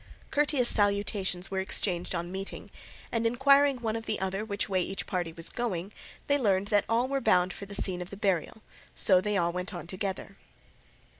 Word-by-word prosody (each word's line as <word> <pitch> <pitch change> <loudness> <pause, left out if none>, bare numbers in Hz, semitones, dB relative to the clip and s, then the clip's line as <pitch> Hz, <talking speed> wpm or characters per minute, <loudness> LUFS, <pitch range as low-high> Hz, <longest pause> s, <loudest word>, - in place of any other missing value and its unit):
Courteous 290 -4 +2
salutations 200 -3 +1
were 190 - -1
exchanged 185 -2 -2
on 170 +1 -3
meeting, 190 +1 -6 0.4
and 230 -1 +1
inquiring 275 +3 +4
one 225 -2 -2
of 225 0 -5
the 215 - -1
other 190 +2 -2
which 205 -2 -2
way 190 -3 +1
each 195 +2 -3
party 175 -3 -2
was 165 0 -2
going, 205 -5 -3 0.3
they 285 0 +2
learned 200 -4 +1
that 205 -1 +3
all 235 +3 +2
were 275 0 -1
bound 185 -5 +3
for 200 - -8
the 200 - -6
scene 180 -3 +1
of 180 - -6
the 200 - -9
burial, 195 0 -1 0.3
so 185 -2 +5
they 205 0 0
went 180 +2 -2
on 175 - -4
all - - -11
together. 195 +2 -5
200 Hz, 195 wpm, -29 LUFS, 185-225 Hz, 0.4 s, so